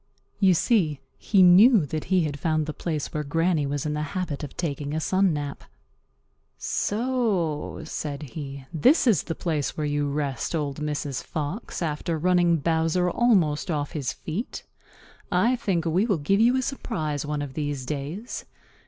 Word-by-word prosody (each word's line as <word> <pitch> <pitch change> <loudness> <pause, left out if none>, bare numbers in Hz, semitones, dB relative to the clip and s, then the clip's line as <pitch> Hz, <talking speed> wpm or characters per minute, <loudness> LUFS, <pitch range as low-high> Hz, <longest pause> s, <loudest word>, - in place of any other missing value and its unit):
You 190 -3 +5
see, 160 - +2 0.2
he 195 -3 +4
knew 190 - +7
that 155 +2 -4
he 185 -1 +2
had 145 -2 -3
found 155 -1 +1
the 155 - -4
place 155 -3 -3
where 150 - -1
Granny 165 0 +1
was 145 0 -2
in 150 - -1
the 150 - -2 0.2
habit 160 -6 -3
of 145 - -8
taking 145 -3 -3
a - - 0
sun 190 +3 +2
nap. 145 -2 -4 0.9
"So," 210 - -1
said 150 -2 -4
he, 140 -1 -7
"this 255 - +4
is 215 - +4
the 165 - -5
place 155 -5 -2
where 155 - -1
you 145 0 0
rest, 140 +2 -2
Old 145 -3 -2
Mrs. 150 -3 -3
Fox, 165 +6 -4
after 160 +1 -2
running 175 0 +3
Bowser 165 +3 +1
almost 180 -13 +2
off 145 -3 -1
his 140 -5 -2
feet. 180 +10 -5 0.7
I 220 +7 +3
think 180 -8 -1
we 180 +7 +2
will 200 -6 +2
give 175 +7 +1
you 240 +3 +4
a 260 - 0
surprise 160 - -3
one 150 0 -2
of 140 -2 -7
these 145 -3 -3
days. 150 - -5
160 Hz, 170 wpm, -25 LUFS, 145-185 Hz, 0.9 s, knew